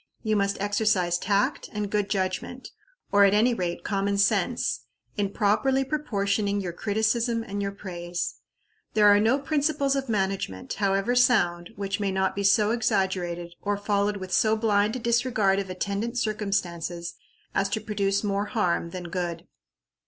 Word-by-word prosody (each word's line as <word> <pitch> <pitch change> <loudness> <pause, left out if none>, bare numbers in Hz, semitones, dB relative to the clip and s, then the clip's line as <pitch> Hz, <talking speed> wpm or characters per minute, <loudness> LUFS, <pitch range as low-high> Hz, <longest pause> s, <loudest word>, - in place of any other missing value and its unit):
You 215 -1 +1
must 200 -1 0
exercise 205 -4 +1
tact 200 +1 0
and 210 -1 -3
good 205 -1 0
judgment, 190 +6 -3 0.4
or 200 0 +6
at 200 0 +5
any 235 +4 +4
rate, 180 -5 -3
common 200 0 0
sense, 195 - +1 0.3
in 200 -1 0
properly 245 +7 +2
proportioning 205 -8 -1
your 180 -3 -4
criticism 225 +4 0
and 200 -2 -4
your 200 0 -2
praise. 175 -3 -5 0.6
There 210 -1 +5
are 205 0 +7
no 225 +5 +3
principles 285 -1 0
of 270 -2 -2
management, 190 - -2
however 195 +3 +1
sound, 175 -9 +3
which 200 +1 -3
may 200 -2 0
not 190 0 0
be 200 - -2
so 210 +2 +4
exaggerated, 185 -6 -1
or 205 0 -1
followed 205 0 0
with 185 -1 -6
so 215 +3 +3
blind 215 0 +2
a - - -3
disregard 230 -4 +2
of 195 -1 -4
attendant 200 +6 -3
circumstances, 175 -6 -2 0.4
as 195 0 +1
to 210 - -1
produce 200 -1 -1
more 200 0 0
harm 180 -6 0
than 175 0 -7
good. 175 -1 -3
200 Hz, 155 wpm, -26 LUFS, 190-220 Hz, 0.6 s, are